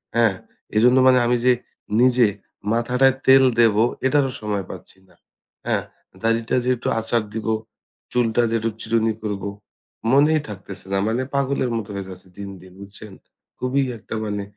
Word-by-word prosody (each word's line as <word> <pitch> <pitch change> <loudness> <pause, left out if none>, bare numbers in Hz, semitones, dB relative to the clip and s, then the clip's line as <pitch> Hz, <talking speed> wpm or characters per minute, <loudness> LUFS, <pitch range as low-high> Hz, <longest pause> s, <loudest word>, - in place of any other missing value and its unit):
হ্যাঁ? 115 -5 +3 0.4
এজন্য 125 +4 +5
মানে 130 -1 +6
আমি 120 +1 +2
যে 125 - +6 0.5
নিজে 125 -2 +5 0.5
মাথাটায় 125 +3 +2
তেল 135 0 +8 0.2
দেব 115 -3 +4 0.3
এটারও 135 -1 +2
সময় 105 -3 -2
পাচ্ছি - - -11
না। 90 - -23 0.5
হ্যাঁ? - - +1 0.4
দাড়িটা 115 0 +1
যে 125 - -1
একটু 120 - -3
আচার 115 0 0
দিবো, 110 0 -1 0.6
চুলটা 120 -1 +2
যে 115 - 0
একটু 115 +1 -1
চিরুনি 115 0 +1
করব 105 -2 -3 0.7
মনেই 150 +3 +4
থাকতেছে 100 -1 -9
না। 95 - +2
মানে 115 +3 0
পাগলের 135 -2 0
মতো 110 -2 -5
হয়ে 100 -1 -5
যাচ্ছে 95 0 -12
দিন 100 -1 -6
দিন 90 0 -15
বুঝছেন? 100 0 -11 0.5
খুবই 135 +2 +1
একটা 105 - -10
মানে 105 -1 -3
115 Hz, 155 wpm, -22 LUFS, 105-125 Hz, 0.7 s, তেল